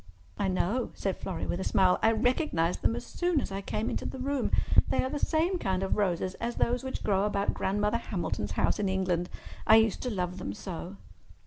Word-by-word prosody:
"I 195 - -1
know," 190 +6 0
said 195 -2 -1
Florrie, 190 - -4
with 175 - -2
a - - -2
smile. 185 -2 +3
"I 225 - +5
recognized 225 - +1
them 230 - +2
as - - -5
soon 350 -3 0
as 230 - -4
I 195 +1 -3
came 210 +3 -2
into - - -2
the - - -6
room. 270 0 -1 0.4
They - - +1
are 260 - -2
the 295 - -2
same 345 +5 +1
kind 190 - 0
of 190 - 0
roses 185 -2 0
as 235 +1 -2
those 245 +2 +1
which 260 - -4
grow 195 -2 +2
about 200 -1 0
Grandmother 210 +3 0
Hamilton's 170 - -3
house - - +1
in 200 -2 +1
England. 180 -2 0 0.4
I 220 - +8
used 225 -1 +4
to 250 - -2
love 180 -4 -2
them 100 - -4
so." 180 - -6
200 Hz, 215 wpm, -29 LUFS, 185-245 Hz, 0.4 s, I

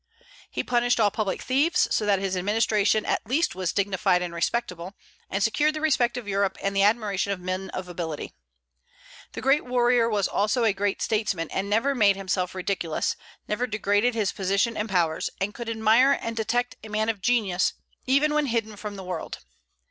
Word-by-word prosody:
He - - -3
punished 245 0 +1
all 210 -2 +4
public 205 -3 -2
thieves; 305 +7 +2
so 210 - +1
that 200 -1 +4
his 190 0 -2
administration 210 +2 +1
at - - 0
least 295 +9 +1
was 185 -2 -2
dignified 190 -2 +1
and 175 -1 -5
respectable, 180 0 -2 0.3
and 195 +1 -1
secured 300 +8 +2
the - - -3
respect 255 -6 +1
of 240 -4 -6
Europe 195 -1 0
and 195 0 -2
the 195 - +3
admiration 205 -2 +1
of 195 - -2
men 185 +1 -4
of 185 0 -6
ability. 165 -4 -5 1.0
The - - -6
great 270 +3 +3
warrior 245 -1 +2
was 205 -3 +1
also 215 +4 +1
a 220 -3 +3
great 200 0 -1
statesman, 210 -6 -1
and 195 +1 -2
never 230 +7 +2
made 205 -6 +4
himself 185 -1 -2
ridiculous, 185 -4 -1 0.3
never 235 +4 -1
degraded 215 +2 +1
his 210 -4 0
position 200 +4 0
and 215 +1 -3
powers, 170 -4 0
and 200 +2 -2
could 235 -1 -6
admire 225 +4 +4
and 230 0 -4
detect 245 +2 -1
a 220 - -9
man 215 +1 0
of 220 -4 -2
genius, 205 -6 +1 0.3
even 285 +3 +3
when 300 -1 +1
hidden 225 -3 -2
from 210 0 -6
the 190 - -8
world. 180 0 -5
210 Hz, 185 wpm, -25 LUFS, 195-240 Hz, 1.0 s, all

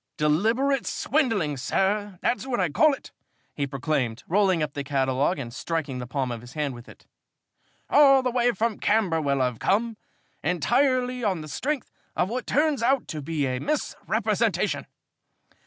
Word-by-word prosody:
"Deliberate 225 - +1
swindling, 225 - 0
sir 200 +7 0
that's 250 +2 0
what 245 -4 -1
I 180 -3 +2
call 305 - +4
it," - - -15 0.4
he 140 -1 -2
proclaimed, 135 -4 -2
rolling 185 -3 +2
up 150 -2 -3
the 140 - -4
catalogue 135 +3 +1
and 120 -4 -6
striking 145 -2 -3
the 125 - -6
palm 130 -1 -2
of 115 -1 -5
his 120 +2 -12
hand 150 -3 -2
with 120 -1 -12
it. - - -16 0.8
"All 275 -2 +6
the 250 - 0
way 245 0 +2
from 220 +2 -1
Camberwell 165 -11 +1
I've 125 -3 -2
come, 225 +3 +1 0.5
entirely 250 - +1
on 190 -6 0
the 155 - -8
strength 275 - -3 0.2
of 180 - +1
what 250 +3 -4
turns 295 -1 +2
out 260 +2 +2
to 155 - -4
be 150 0 -1
a 130 -1 -1
misrepresentation. 300 - -1
180 Hz, 160 wpm, -25 LUFS, -, 0.8 s, All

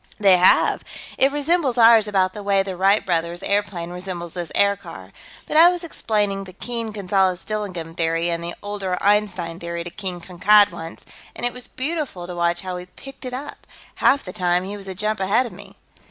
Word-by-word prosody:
"They 195 -3 +6
have. 180 - +4 0.4
It 270 +1 +4
resembles 290 -2 +1
ours 225 -2 +7
about 190 -2 +1
the 210 - -7
way 200 -1 +2
the 190 -1 -5
Wright 195 +3 +3
Brothers' 170 -1 -1
airplane 200 -4 -1
resembles 180 -2 -6
this 175 -3 -5
aircar, 200 0 -1 0.3
but - - 0
I 335 +2 +9
was 355 0 -3
explaining 210 -10 -1
the 185 - -12
Keene 230 +3 -4
Gonzales 190 -3 0
Dillingham 185 -6 -4
Theory 165 0 0
and 170 0 -3
the 170 0 -4
older 200 -3 -3
Einstein 195 -5 0
Theory 170 -1 -5
to 175 - -8
King 185 -2 -5
Kankad 200 +4 +4
once, 165 -1 -9 0.3
and - - -4
it 245 - 0
was 250 0 -9
beautiful 280 - -4
to 180 0 -7
watch 170 0 0
how 185 -1 -5
he 180 0 -9
picked 270 +9 -12
it 250 - -5
up. 285 +3 -8 0.3
Half 275 - +3
the 180 - -7
time, 180 -2 +1
he 200 +2 -5
was 200 -1 -8
a 190 - -6
jump 215 +2 -1
ahead 205 +7 +2
of 240 - -7
me." - - -13
195 Hz, 200 wpm, -22 LUFS, 175-215 Hz, 0.4 s, I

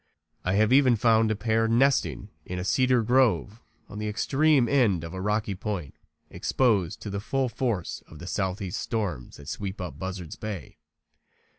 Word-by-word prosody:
I 90 - 0
have 110 +4 +3
even 130 -3 +6
found 110 0 +3
a 110 - +1
pair 115 +1 +1
nesting 115 - +2
in 90 - -6
a 90 - -3
cedar 125 +4 +3
grove 120 -2 +2 0.3
on 105 - -8
the 105 - -3
extreme 135 +5 +2
end 115 - +2
of 85 - -7
a 95 - -5
rocky 105 +1 0
point 95 -5 -4 0.4
exposed 105 -7 +1
to 105 - -5
the 100 - -2
full 130 +5 -1
force 115 -8 -2
of 75 - -13
the 90 - -9
southeast 95 0 -2
storms 100 - -3
that 70 - -13
sweep 100 +5 -5
up 90 -1 -6
Buzzard's 95 -3 -6
bay. 105 - -7
105 Hz, 170 wpm, -27 LUFS, 95-120 Hz, 0.4 s, even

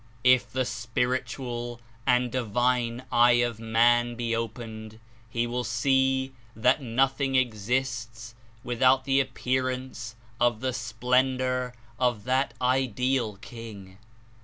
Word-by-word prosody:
"If 125 0 +4
the 130 0 0
spiritual 120 0 -3 0.3
and 125 -1 +3
divine 120 0 0
eye 120 +1 +6
of 120 -2 -5
man 120 +1 +3
be 115 -1 -1
opened, 110 -1 -6 0.3
he 115 +1 0
will 120 +1 -2
see 130 +2 +1 0.2
that 125 +6 +3
nothing 135 +2 +1
exists 115 -1 -1 0.3
without 130 +2 +3
the 135 0 +3
appear 130 -1 0
ance 125 -3 -6 0.2
of 120 -2 +2
the 130 +1 -1
splendor 125 +2 0 0.2
of 120 -5 +1
that 130 +2 0
Ideal 125 -2 +1
King. 100 -5 -10
125 Hz, 110 wpm, -27 LUFS, 115-130 Hz, 0.3 s, eye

